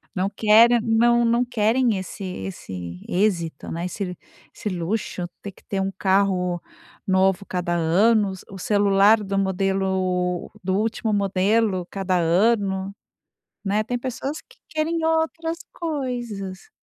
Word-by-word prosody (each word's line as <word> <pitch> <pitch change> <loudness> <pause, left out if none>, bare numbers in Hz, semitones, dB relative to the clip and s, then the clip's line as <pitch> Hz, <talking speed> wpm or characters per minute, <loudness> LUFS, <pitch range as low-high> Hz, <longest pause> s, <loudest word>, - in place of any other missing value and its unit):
Não 185 +2 +1
querem, 225 +3 +5
não 235 +1 +3
não 235 +1 +3
querem 235 -1 +2
esse 190 +1 -6
esse 95 - -6
êxito, 175 -6 0
né, 170 +2 -3
esse 180 0 -4 0.4
esse 210 - -4
luxo, 180 0 -3
tem 200 - -6
que - - -23
ter 195 -1 -2
um 190 0 0
carro 190 -2 +1 0.5
novo 190 +1 +2
cada 175 -1 -2
ano, 200 +6 +3 0.2
o - - -10
o - - -8
celular 205 +2 +4
do 195 0 -1
modelo 190 -2 0
do 185 +1 0
último 220 +1 -1
modelo 200 -1 +1
cada 190 -2 0
ano, 190 +2 +1 0.7
né, 205 +2 +1
tem 245 +3 -3
pessoas 265 +4 -4
que - - -22
querem 325 0 -1
outras 325 +1 0
coisas. 240 - -4
195 Hz, 130 wpm, -23 LUFS, 185-230 Hz, 0.7 s, querem